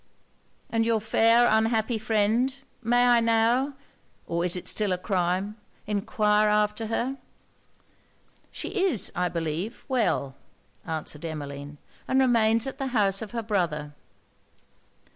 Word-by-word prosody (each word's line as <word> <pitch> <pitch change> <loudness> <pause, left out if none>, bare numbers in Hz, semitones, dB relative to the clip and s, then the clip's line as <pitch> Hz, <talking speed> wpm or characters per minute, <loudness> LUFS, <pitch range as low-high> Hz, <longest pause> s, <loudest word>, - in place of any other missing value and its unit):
'And 225 0 +2
your 225 -1 +1
fair 230 +2 +4
unhappy 220 +1 +1
friend? 220 +4 +1 0.3
May 245 +1 +3
I 240 -1 +5
now 230 +4 +2 0.5
(or 170 0 -2
is 180 0 +1
it 180 - -6
still 210 -3 -1
a 180 - +1
crime,) 185 +2 -1 0.3
enquire 210 0 +1
after 210 +1 +1
her.' 255 +4 -2 1.3
'She - - -6 0.2
is, 285 - +1
I 180 0 0
believe, 170 +7 -4
well,' 225 - 0 0.5
answered 155 -1 -3
Emmeline, 145 -2 -6 0.3
'and 260 - +2
remains 230 -3 +3
at 270 +1 -6
the 270 - -2
house 195 -1 +3
of 220 - -6
her 230 0 -4
brother.' 170 -8 -1
215 Hz, 125 wpm, -26 LUFS, 180-230 Hz, 1.3 s, I